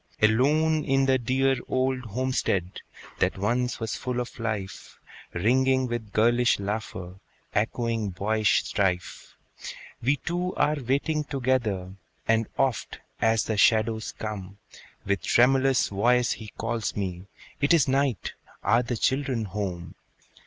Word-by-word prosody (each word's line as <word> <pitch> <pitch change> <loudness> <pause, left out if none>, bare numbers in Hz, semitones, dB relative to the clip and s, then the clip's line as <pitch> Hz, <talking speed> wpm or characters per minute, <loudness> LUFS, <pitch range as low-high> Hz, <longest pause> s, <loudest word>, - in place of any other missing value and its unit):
Alone 150 +8 +3
in 135 0 +2
the 130 -1 +3
dear 130 +2 +1
old 130 0 0
homestead 110 -6 -1 0.4
That - - +1
once 120 +5 0
was 115 -2 -3
full 125 -1 -3
of 125 0 -6
life, 110 -4 -5 0.3
Ringing 130 +7 +2
with 120 -4 -4
girlish 120 +3 +3
laughter, 100 -3 -5 0.3
Echoing 115 0 0
boyish 105 +3 +1
strife, 90 -3 -2 0.7
We 140 +5 +2
two 175 +5 -3
are 150 +1 +2
waiting 140 +5 0
together; 120 -10 -1 0.3
And 115 0 +2
oft, 130 -4 0 0.2
as 110 -1 +3
the 110 - -2
shadows 110 +1 +2
come, 100 -2 -6 0.5
With 100 0 0
tremulous 135 +2 +3
voice 120 +5 +2
he 110 - -5
calls 115 0 -2
me, 95 -2 -4 0.3
"It 145 - +2
is 160 -5 +5
night! 135 - 0 0.3
are 115 - +4
the 120 -1 -3
children 130 -2 0
home?" 95 -4 -4
115 Hz, 125 wpm, -26 LUFS, 105-130 Hz, 0.7 s, is